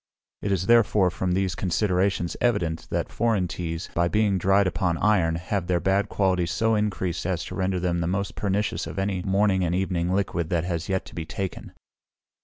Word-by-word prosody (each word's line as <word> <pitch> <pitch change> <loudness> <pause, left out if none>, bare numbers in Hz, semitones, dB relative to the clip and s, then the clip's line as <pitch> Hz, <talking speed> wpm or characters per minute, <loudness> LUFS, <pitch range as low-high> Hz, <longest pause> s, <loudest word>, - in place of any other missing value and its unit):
It 100 - -2
is 95 -2 0
therefore, 105 -5 +4
from 90 -1 -1
these 95 -1 0
considerations, 95 -1 0
evident, 85 -9 0
that - - -2
foreign 110 -6 +1
teas, 85 -1 -4
by 85 0 +2
being 105 0 +2
dried 95 +3 +3
upon 90 -2 0
iron, 95 -6 +2
have 90 +2 -3
their 90 -1 +2
bad 95 +3 +1
qualities 90 -4 +1
so 110 +5 +1
increased 95 -5 -1
as 90 -4 -2
to - - -7
render 95 -1 0
them 85 -1 0
the 85 - -1
most 100 +2 -2
pernicious 100 +1 -1
of - - -7
any 95 -1 -1
morning 95 0 +2
and 85 0 0
evening 90 -2 0
liquid 90 -4 -1
that 85 -2 +1
has 85 -1 -3
yet 95 -1 -2
been 80 -2 -5
taken. 95 +2 -5
95 Hz, 190 wpm, -25 LUFS, 85-100 Hz, -, therefore